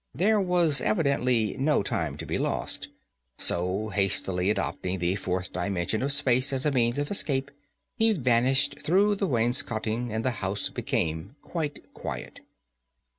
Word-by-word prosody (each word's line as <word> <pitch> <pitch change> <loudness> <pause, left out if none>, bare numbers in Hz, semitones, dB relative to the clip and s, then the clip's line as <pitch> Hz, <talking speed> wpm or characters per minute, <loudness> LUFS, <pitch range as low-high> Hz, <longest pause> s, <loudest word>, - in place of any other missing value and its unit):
There 205 - +3
was 175 -6 +3
evidently 125 - +1
no 145 -5 +2
time 80 -7 -2
to - - -6
be - - -2
lost, - - -1 0.5
so, 90 +5 0
hastily 95 -2 +1
adopting 95 -3 -2
the 90 0 +1
Fourth 90 -2 -3
dimension 90 +2 -1
of 140 +2 0
Space 135 -2 +2
as 135 0 -1
a 150 - +3
means 120 -1 +1
of 145 +3 -2
escape, 140 -8 0 0.5
he 225 -1 +4
vanished 130 - +2
through 200 +5 +3
the 200 -1 -1
wainscoting, 120 -2 0
and 110 +2 -2
the 130 - +2
house 95 +1 -2
became 80 - -2
quite 155 -4 -5
quiet. - - -7
125 Hz, 145 wpm, -27 LUFS, 100-145 Hz, 0.5 s, he